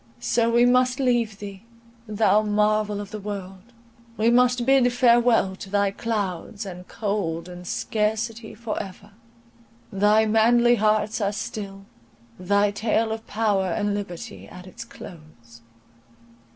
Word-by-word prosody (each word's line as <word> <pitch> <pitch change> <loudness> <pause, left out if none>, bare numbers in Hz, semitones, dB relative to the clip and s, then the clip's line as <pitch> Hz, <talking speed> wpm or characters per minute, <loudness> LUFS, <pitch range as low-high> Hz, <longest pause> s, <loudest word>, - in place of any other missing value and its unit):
So 230 -1 +1
we 235 +1 +4
must 250 +1 +3
leave 240 -5 +1
thee, 200 -2 -9 0.5
thou 210 -1 +3
marvel 210 0 +1
of 205 0 -7
the 215 - -5
world; 195 -2 -7 0.6
we 225 +2 +3
must 250 0 +3
bid 265 -2 +4
farewell 240 -5 +3
to 195 - -9
thy 200 0 +1
clouds, 205 0 -4
and 180 -1 -9
cold, 195 -6 -3
and 180 0 -10
scarcity 220 +3 -2
for 225 -1 -4
ever! 200 +2 -11 0.8
Thy 210 +3 +4
manly 235 +2 +4
hearts 215 +1 +1
are 200 0 +1
still; 200 -2 -6 0.5
thy 200 +2 +2
tale 220 +2 0
of 225 0 -6
power 205 -3 0
and 205 +4 -1
liberty 175 - -7
at 180 0 -12
its 220 +5 -9
close! 155 - -14
210 Hz, 135 wpm, -24 LUFS, 195-230 Hz, 0.8 s, we